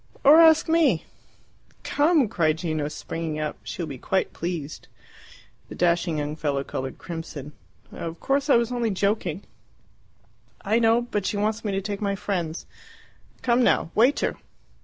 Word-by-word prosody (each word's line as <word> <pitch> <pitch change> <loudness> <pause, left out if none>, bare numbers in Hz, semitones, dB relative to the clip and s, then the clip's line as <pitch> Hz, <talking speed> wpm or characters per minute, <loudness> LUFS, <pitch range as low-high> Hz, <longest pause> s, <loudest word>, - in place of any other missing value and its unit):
Or 300 +4 +8
ask 320 0 +6
me!" 310 - +3 0.8
"Come!" 295 -3 +3
cried 160 -5 +1
Gino, 155 -3 -2
springing 155 +1 -5
up. 150 -1 -3
"She 175 - -5
will - - -4
be 135 -4 -7
quite 190 +7 -1
pleased." 165 -4 -5 0.8
The - - -8
dashing 170 -2 +1
young 150 0 -3
fellow 145 -3 -1
coloured 130 -1 -5
crimson. 160 -4 -7 0.4
"Of 165 0 -6
course 275 +1 0
I - - +6
was 235 +1 +2
only 240 -2 0
joking." 200 -3 -1 1.2
"I 220 +4 +1
know. 230 +1 +3
But 210 -5 -2
she 205 - -1
wants 215 +2 -1
me 210 - -1
to 195 - -1
take 200 +1 -5
my 200 -1 0
friends. 180 -5 -3 0.8
Come 245 0 +3
now! 165 - +2
Waiter!" 245 +7 +2
195 Hz, 155 wpm, -25 LUFS, 160-235 Hz, 1.2 s, Or